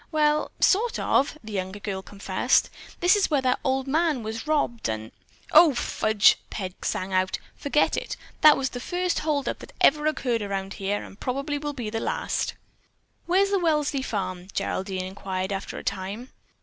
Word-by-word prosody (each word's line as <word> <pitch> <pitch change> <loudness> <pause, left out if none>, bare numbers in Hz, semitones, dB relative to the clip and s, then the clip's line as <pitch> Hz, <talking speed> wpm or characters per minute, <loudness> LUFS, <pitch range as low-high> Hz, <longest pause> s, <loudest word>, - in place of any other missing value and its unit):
"Well, 300 -1 +2
sort 450 +5 +3
of," 285 +3 +1
the 220 - -9
younger 190 +1 -3
girl 195 -2 -4
confessed. 200 +1 +1 0.3
"This 355 +3 +6
is 410 - +2
where 285 -4 +1
that 255 -1 +2
old 265 0 0
man 300 -2 +1
was 225 +5 -5
robbed, 285 - 0
and——" 110 0 -4 0.4
"O, 310 -3 +7
fudge," 220 -3 +3
Peg 185 -3 -6
sang 190 +1 -2
out. 185 0 +1 0.2
"Forget 290 +1 +1
it! - - -4 0.2
That 305 -1 +8
was 265 -1 -1
the 245 - -6
first 355 +6 -1
holdup 300 -3 -1
that - - -12
ever 300 +1 +4
occurred 250 -6 0
around 195 -1 -3
here, 200 +1 -2
and 195 - -13
probably 275 +3 -2
will 295 0 -4
be 240 -6 -5
the 225 - -2
last." - - -2 0.7
"Where 365 +3 +4
is 395 - -1
the 395 - +3
Welsley 300 -5 +1
farm?" 185 -6 -3
Geraldine 190 -1 -2
inquired 190 0 -4
after 195 - -5
a - - -7
time. 200 +6 -4
250 Hz, 175 wpm, -26 LUFS, 195-300 Hz, 0.7 s, That